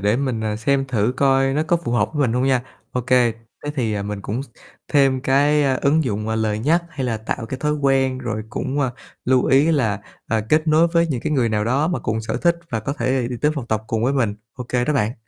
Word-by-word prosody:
để 105 Hz, +3 st, +2 dB
mình, 130 Hz, -4 st, -1 dB
à, 105 Hz, -1 st, -1 dB
xem 135 Hz, +4 st, +1 dB
thử 120 Hz, -2 st, 0 dB
coi 135 Hz, 0 st, +3 dB
nó 150 Hz, -, +1 dB
có 165 Hz, +2 st, +2 dB
phù 165 Hz, -8 st, -4 dB
hợp 105 Hz, -4 st, +2 dB
với 150 Hz, -, -2 dB
mình 115 Hz, -, -1 dB
hông 125 Hz, +1 st, +1 dB
nha. 130 Hz, -2 st, +2 dB, 0.3 s
Ô 125 Hz, -, -1 dB
kê, 125 Hz, -1 st, +3 dB, 0.3 s
thế 145 Hz, -, -2 dB
thì, 115 Hz, -6 st, -1 dB
à, 100 Hz, -, -2 dB
mình 105 Hz, 0 st, -4 dB
cũng 110 Hz, +6 st, -3 dB, 0.5 s
thêm 135 Hz, -3 st, +3 dB
cái 145 Hz, +3 st, +3 dB
ứng 150 Hz, +4 st, +2 dB
dụng, 105 Hz, -3 st, -2 dB
à, 110 Hz, -, 0 dB
lời 110 Hz, -1 st, 0 dB
nhắc 160 Hz, +9 st, +2 dB
hay 135 Hz, -5 st, -4 dB
là 115 Hz, -, -1 dB
tạo 110 Hz, +2 st, -4 dB
cái 130 Hz, -, -5 dB
thói 150 Hz, 0 st, +1 dB
quen 135 Hz, -2 st, +1 dB
rồi 115 Hz, -4 st, -3 dB
cũng, 135 Hz, +3 st, -2 dB
à, 130 Hz, -3 st, +1 dB, 0.3 s
lưu 130 Hz, 0 st, +3 dB
ý 140 Hz, +5 st, +4 dB
là, 110 Hz, -9 st, +1 dB, 0.3 s
à, 110 Hz, -1 st, 0 dB
kết 155 Hz, +3 st, +3 dB
nối 155 Hz, +2 st, +5 dB
với 170 Hz, 0 st, +2 dB
những 130 Hz, -7 st, -2 dB
cái -, -, -2 dB
người 130 Hz, -5 st, +2 dB
nào 105 Hz, -1 st, 0 dB
đó 140 Hz, +8 st, +1 dB
mà 175 Hz, -, -1 dB
cùng 110 Hz, +1 st, -2 dB
sở 110 Hz, -, -3 dB
thích 170 Hz, -1 st, +2 dB
và 115 Hz, -, -1 dB
có 135 Hz, +6 st, -3 dB
thể 130 Hz, -3 st, 0 dB
đi 125 Hz, -, -4 dB
tới 150 Hz, -, +3 dB
phòng 135 Hz, -5 st, -5 dB
tập 110 Hz, -2 st, -1 dB
cùng 110 Hz, 0 st, -1 dB
với 130 Hz, -, +2 dB
mình. 120 Hz, -7 st, +1 dB, 0.2 s
Ô 125 Hz, -, -6 dB
kê 125 Hz, -1 st, +1 dB
đó 150 Hz, -, 0 dB
bạn. 115 Hz, -3 st, 0 dB
130 Hz, 265 wpm, -21 LUFS, 110-140 Hz, 0.5 s, nối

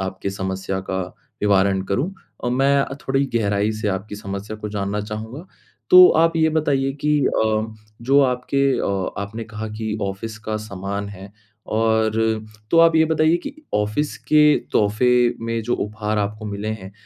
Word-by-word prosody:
आपकी 95 Hz, +1 st, -3 dB
समस्या 95 Hz, 0 st, -3 dB
का 95 Hz, 0 st, -1 dB, 0.4 s
निवारण 100 Hz, -1 st, +3 dB
करूँ, 145 Hz, -, 0 dB, 0.3 s
अ, -, -, +1 dB
मैं 135 Hz, +3 st, +3 dB
अ, 135 Hz, -, -3 dB
थोड़ी 135 Hz, +1 st, +2 dB
गहराई 105 Hz, -1 st, +1 dB
से 105 Hz, -, +1 dB
आपकी 100 Hz, +2 st, -3 dB
समस्या 100 Hz, +1 st, -6 dB
को 105 Hz, 0 st, -6 dB
जानना 100 Hz, 0 st, -2 dB
चाहूँगा। 110 Hz, -, -7 dB, 0.4 s
तो 365 Hz, 0 st, +10 dB, 0.2 s
आप 165 Hz, 0 st, +3 dB
ये 160 Hz, -1 st, +3 dB
बताइए 135 Hz, -3 st, +1 dB
कि 150 Hz, 0 st, +3 dB
अ, 110 Hz, 0 st, 0 dB, 0.3 s
जो 135 Hz, +3 st, +4 dB
आपके 135 Hz, +1 st, +1 dB
अ, 95 Hz, -2 st, -2 dB
आपने 110 Hz, +3 st, -6 dB
कहा 110 Hz, 0 st, -6 dB
कि 110 Hz, -1 st, -2 dB
ऑफ़िस 100 Hz, +3 st, -4 dB
का 110 Hz, -, 0 dB
सामान 100 Hz, -1 st, -5 dB
है, 100 Hz, 0 st, -11 dB, 0.4 s
और 110 Hz, 0 st, +2 dB, 0.6 s
तो 165 Hz, -, +4 dB
आप 165 Hz, -1 st, +5 dB
ये 160 Hz, -, +5 dB
बताइए 160 Hz, +1 st, +3 dB
कि 285 Hz, +10 st, -7 dB, 0.2 s
ऑफ़िस 105 Hz, +9 st, -1 dB
के 150 Hz, 0 st, +6 dB, 0.3 s
तोहफे 105 Hz, +4 st, +2 dB, 0.4 s
में 115 Hz, 0 st, -1 dB
जो 120 Hz, +2 st, 0 dB
उपहार 105 Hz, 0 st, -2 dB
आपको 105 Hz, +2 st, -3 dB
मिले 105 Hz, +1 st, -4 dB
हैं, 100 Hz, -3 st, -6 dB
110 Hz, 165 wpm, -21 LUFS, 100-135 Hz, 0.6 s, तो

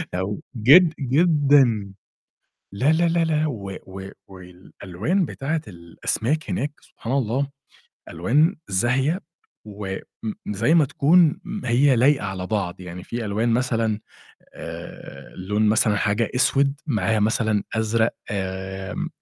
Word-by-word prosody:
أو 95 Hz, +3 st, -2 dB, 0.2 s
جد 155 Hz, +9 st, +6 dB
جدًا 140 Hz, -, +3 dB, 0.8 s
لا، 130 Hz, +9 st, +2 dB
لا، 170 Hz, +2 st, +2 dB
لا، 170 Hz, 0 st, +2 dB
لا، 155 Hz, -1 st, +1 dB
و 100 Hz, -9 st, -5 dB
و 95 Hz, +1 st, -8 dB, 0.2 s
والألوان 95 Hz, -, -4 dB
بتاعة 155 Hz, +2 st, -3 dB
الأسماك 105 Hz, -, -3 dB
هناك 145 Hz, +2 st, -2 dB
سبحان 120 Hz, +3 st, -7 dB
الله 135 Hz, +1 st, 0 dB, 0.6 s
ألوان 145 Hz, -, +2 dB
زاهية 130 Hz, -, +1 dB, 0.5 s
وإمم 100 Hz, -2 st, -6 dB, 0.5 s
زي 110 Hz, +9 st, +1 dB
ما 165 Hz, -3 st, +5 dB
تكون 155 Hz, +4 st, +3 dB, 0.3 s
هي 130 Hz, +3 st, +4 dB
لايقة 130 Hz, 0 st, +3 dB
على 95 Hz, -1 st, -4 dB
بعض، 95 Hz, -4 st, -2 dB
يعني 90 Hz, 0 st, -8 dB
في 115 Hz, +3 st, -5 dB
ألوان 110 Hz, +3 st, 0 dB
مثلًا 115 Hz, -3 st, 0 dB, 0.6 s
آآ -, -, -9 dB
لون 105 Hz, +3 st, 0 dB
مثلًا 105 Hz, 0 st, +3 dB
حاجة 105 Hz, +2 st, 0 dB
أسود 140 Hz, +2 st, +2 dB
معاها 110 Hz, -5 st, +1 dB
مثلًا 110 Hz, -1 st, +1 dB
أزرق 110 Hz, +1 st, +1 dB, 0.2 s
آمم، 95 Hz, -1 st, -4 dB
115 Hz, 120 wpm, -23 LUFS, 100-140 Hz, 0.8 s, جد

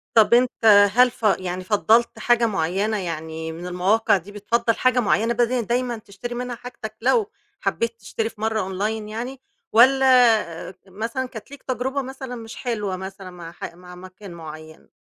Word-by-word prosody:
طَب 220 Hz, 0 st, +6 dB
أنت، 245 Hz, +1 st, +5 dB, 0.4 s
هل 250 Hz, +2 st, +5 dB
ف 230 Hz, -, -20 dB, 0.2 s
يعني 185 Hz, 0 st, -4 dB
فَضّلت 220 Hz, +4 st, +2 dB
حاجة 240 Hz, -1 st, +3 dB
مُعيّنة 195 Hz, +2 st, 0 dB
يعني 160 Hz, -3 st, -5 dB
من 170 Hz, +2 st, -7 dB
المواقع 190 Hz, +4 st, +2 dB
دي، 190 Hz, +4 st, -11 dB
بتفضّل 230 Hz, +3 st, 0 dB
حاجة 255 Hz, 0 st, +2 dB
مُعيّنة 225 Hz, +1 st, +2 dB
بدل 240 Hz, +1 st, +1 dB
دايمًا 240 Hz, +2 st, -1 dB
تشتري 220 Hz, +3 st, -8 dB
منها 245 Hz, 0 st, -4 dB
حاجتك 230 Hz, -3 st, -9 dB
لو 390 Hz, -, +2 dB, 0.3 s
حبّيت 230 Hz, 0 st, -2 dB
تشتري 220 Hz, +2 st, -3 dB
في 220 Hz, -2 st, -16 dB
مرّة 220 Hz, 0 st, 0 dB, 0.2 s
Online 210 Hz, -, +1 dB, 0.2 s
يعني 245 Hz, +5 st, -5 dB, 0.3 s
والّا 240 Hz, -8 st, +4 dB
مثلًا 225 Hz, +7 st, -3 dB
كانت 225 Hz, +2 st, -11 dB
ليك 285 Hz, -, -11 dB
تجربة 260 Hz, +2 st, -2 dB
مثلًا 265 Hz, -1 st, -7 dB
مش 225 Hz, -1 st, -9 dB
حلوة 210 Hz, -6 st, -3 dB
مثلًا 190 Hz, 0 st, -8 dB
مع 170 Hz, -2 st, -10 dB
ح 170 Hz, -, -8 dB
مع 180 Hz, 0 st, -13 dB
مكان 185 Hz, +1 st, -11 dB
مُعيّن؟ 155 Hz, -1 st, -11 dB
220 Hz, 165 wpm, -23 LUFS, 185-245 Hz, 0.4 s, طَب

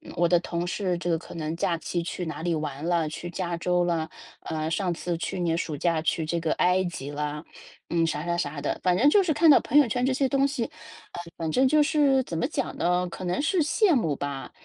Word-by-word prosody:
我 170 Hz, 0 st, +3 dB
的 175 Hz, -1 st, +5 dB
同 170 Hz, 0 st, -3 dB
事 180 Hz, -1 st, -1 dB
这 175 Hz, 0 st, -3 dB
个 165 Hz, -, +2 dB
可 -, -, -11 dB
能 160 Hz, 0 st, -3 dB
假 170 Hz, 0 st, 0 dB
期 170 Hz, +1 st, -3 dB
去 175 Hz, +1 st, -4 dB
哪 155 Hz, -1 st, -5 dB
里 170 Hz, 0 st, 0 dB
玩 150 Hz, 0 st, -4 dB
了， 170 Hz, -3 st, +1 dB
去 175 Hz, +3 st, -6 dB
加 175 Hz, -1 st, -3 dB
州 180 Hz, +1 st, +1 dB
了， 165 Hz, -2 st, -1 dB, 0.3 s
呃， 155 Hz, 0 st, -3 dB
上 180 Hz, 0 st, 0 dB
次 170 Hz, 0 st, -3 dB
去 180 Hz, -, -4 dB
年 165 Hz, -1 st, 0 dB
暑 155 Hz, -3 st, -3 dB
假 165 Hz, 0 st, +1 dB
去 160 Hz, 0 st, 0 dB
这 170 Hz, +2 st, -1 dB
个 160 Hz, -1 st, -1 dB
埃 180 Hz, +1 st, +2 dB
及 145 Hz, -5 st, -5 dB
啦， 150 Hz, +1 st, -4 dB, 0.5 s
嗯， 165 Hz, -1 st, +2 dB
啥 155 Hz, +1 st, -3 dB
啥 170 Hz, 0 st, -1 dB
啥 145 Hz, -2 st, -3 dB
的。 145 Hz, -, -2 dB
反 180 Hz, -1 st, +3 dB
正 285 Hz, +7 st, +5 dB
就 405 Hz, +5 st, +5 dB
是 320 Hz, -4 st, +1 dB
看 325 Hz, +2 st, +4 dB
到 280 Hz, -, +8 dB
朋 290 Hz, -, +1 dB
友 290 Hz, -5 st, +6 dB
圈 245 Hz, +3 st, 0 dB
这 260 Hz, -, +1 dB
些 270 Hz, +1 st, +1 dB
东 275 Hz, 0 st, +3 dB
西， 270 Hz, -4 st, -2 dB
呃， -, -, -13 dB, 0.5 s
反 160 Hz, -1 st, -2 dB
正 260 Hz, +7 st, +3 dB
就 305 Hz, +2 st, +4 dB
是 285 Hz, -3 st, +3 dB
怎 165 Hz, -8 st, -5 dB
么 -, -, 0 dB
讲 285 Hz, -4 st, -3 dB
呢？ 180 Hz, +1 st, +1 dB
可 185 Hz, -, -8 dB
能 180 Hz, +9 st, -1 dB
是 340 Hz, +3 st, +1 dB
羡 385 Hz, +3 st, +3 dB
慕 160 Hz, -, +1 dB
吧， 140 Hz, -1 st, -5 dB
175 Hz, 265 characters per minute, -26 LUFS, 160-240 Hz, 0.5 s, 到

